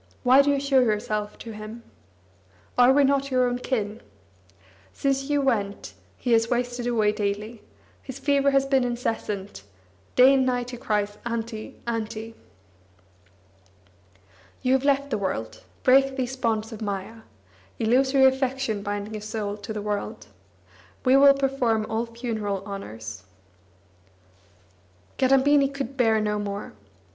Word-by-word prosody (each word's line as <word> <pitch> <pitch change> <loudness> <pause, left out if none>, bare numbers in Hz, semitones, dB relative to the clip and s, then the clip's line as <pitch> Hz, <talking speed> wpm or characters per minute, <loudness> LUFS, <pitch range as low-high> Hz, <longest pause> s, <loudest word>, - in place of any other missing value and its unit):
Why 260 +2 +7
do 285 - +1
you 280 -1 +2
show 275 -1 +3
yourself 210 -3 -1
to 230 - -9
him? 215 +2 -9 0.9
Are 250 +1 +6
we 285 +1 +4
not 275 0 +2
your 255 -1 +2
own 245 0 -2
kin? 220 -5 -3 0.9
Since 275 0 -1
you 290 -1 +2
went, 205 -7 -1 0.2
he 245 - -2
has 225 0 +3
wasted 245 0 -1
away 220 -3 +2
daily; 210 +1 -3 0.4
his 260 -1 -8
fever 280 0 +2
has 275 -1 +3
been 270 -2 +2
incessant; 220 - -3 0.5
day 255 +2 +7
and 265 -1 +3
night 250 -1 -1
he 245 - -7
cries: 210 -2 -2
'Auntie, 230 -2 -5
Auntie.' 225 -1 -4 2.3
You 255 - +3
have 265 +1 +1
left 280 0 +1
the 215 - 0
world; 115 - -4 0.2
break 270 +1 +4
these 260 -1 -3
bonds 225 -3 -1
of 220 - -8
maya 200 +1 -4 0.6
(Illusory 265 +4 +3
affection 265 -4 +1
binding 205 +1 -4
a 210 - -5
soul 210 -1 -4
to 205 +1 -8
the 210 -1 -4
world). 205 - -4 0.8
We 255 +1 +5
will 275 0 +7
perform 260 -5 0
all 225 +1 -2
funeral 220 -5 -4
honours." 110 - -7 2.0
Kadambini 270 +2 +4
could 275 -1 -5
bear 225 -4 +3
no 210 -1 -1
more. 205 0 -5
235 Hz, 135 wpm, -25 LUFS, 210-265 Hz, 2.3 s, Why